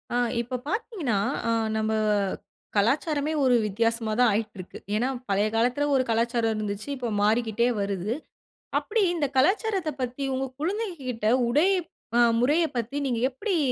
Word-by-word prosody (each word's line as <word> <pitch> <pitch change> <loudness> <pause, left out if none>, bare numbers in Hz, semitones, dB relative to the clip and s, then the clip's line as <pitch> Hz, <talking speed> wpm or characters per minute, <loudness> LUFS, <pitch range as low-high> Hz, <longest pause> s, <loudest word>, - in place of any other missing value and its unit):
ஆ - - +3 0.2
இப்ப 250 +2 -4
பாத்தீங்கன்னா, 375 - -1 0.3
அ - - +1 0.3
நம்ம 220 0 0 0.8
கலாச்சாரமே 290 +8 +1
ஒரு 255 -2 +4
வித்தியாசமா 230 +2 0
தான் 245 -1 +6
ஆயிட்டுருக்கு. 205 -3 -4 0.2
ஏன்னா 235 +4 +1 0.2
பழைய 200 +2 +2
காலத்துல 245 +5 +2
ஒரு 260 - +3
கலாச்சாரம் 230 0 +1
இருந்துச்சு, 210 +1 -4
இப்ப 250 -3 -3
மாறிக்கிட்டே 225 +2 +2
வருது. 200 +1 -1 0.7
அப்டி 455 - -1
இந்த 310 -4 0
கலாச்சாரத்த 380 - +2
பத்தி 255 +2 -3
உங்க 265 +1 -1 0.2
குழந்தைங்ககிட்ட 315 - -2 0.2
உடை 300 +9 +4 0.5
அ - - +5 0.2
முறைய 295 +8 +3
பத்தி 240 +4 -3
நீங்க 240 -3 0
எப்டி 370 - -2
245 Hz, 135 wpm, -26 LUFS, 220-295 Hz, 0.8 s, தான்